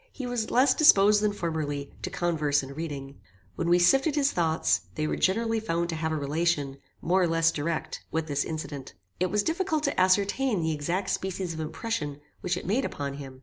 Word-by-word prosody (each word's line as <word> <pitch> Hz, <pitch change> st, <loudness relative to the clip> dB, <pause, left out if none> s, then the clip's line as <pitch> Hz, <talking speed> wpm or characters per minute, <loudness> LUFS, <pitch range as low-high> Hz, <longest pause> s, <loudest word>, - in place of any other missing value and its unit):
He 265 Hz, -, -6 dB
was 245 Hz, -3 st, -2 dB
less 255 Hz, +2 st, +4 dB
disposed 210 Hz, -9 st, +6 dB
than 210 Hz, -1 st, +2 dB
formerly 155 Hz, -7 st, -3 dB
to -, -, -3 dB
converse 150 Hz, -5 st, 0 dB
and 135 Hz, +1 st, -8 dB
reading. 140 Hz, -4 st, -6 dB, 0.4 s
When 170 Hz, -, -1 dB
we 175 Hz, -, +6 dB
sifted 270 Hz, -, +4 dB
his 285 Hz, -1 st, +2 dB
thoughts, 165 Hz, -2 st, +1 dB
they 155 Hz, -, -1 dB
were -, -, -1 dB
generally 225 Hz, +4 st, +1 dB
found 170 Hz, -5 st, -1 dB
to 165 Hz, -, -2 dB
have 160 Hz, 0 st, -2 dB
a -, -, 0 dB
relation, 145 Hz, -1 st, -1 dB, 0.3 s
more 185 Hz, +3 st, +2 dB
or 180 Hz, -, +3 dB
less 165 Hz, 0 st, +3 dB
direct, 160 Hz, +2 st, -3 dB
with 160 Hz, 0 st, -1 dB
this 145 Hz, -2 st, -1 dB
incident. 145 Hz, -, -6 dB, 0.2 s
It 185 Hz, +1 st, +1 dB
was 205 Hz, +2 st, +1 dB
difficult 320 Hz, -, -1 dB
to -, -, 0 dB
ascertain 200 Hz, +3 st, +2 dB
the 160 Hz, -, 0 dB
exact 170 Hz, +6 st, -2 dB
species 190 Hz, -2 st, -3 dB
of 160 Hz, -, -7 dB
impression 155 Hz, -, -3 dB, 0.2 s
which 180 Hz, 0 st, -1 dB
it -, -, -6 dB
made 230 Hz, +8 st, +1 dB
upon 140 Hz, -, -4 dB
him. 135 Hz, -2 st, -9 dB
170 Hz, 200 wpm, -27 LUFS, 150-210 Hz, 0.4 s, disposed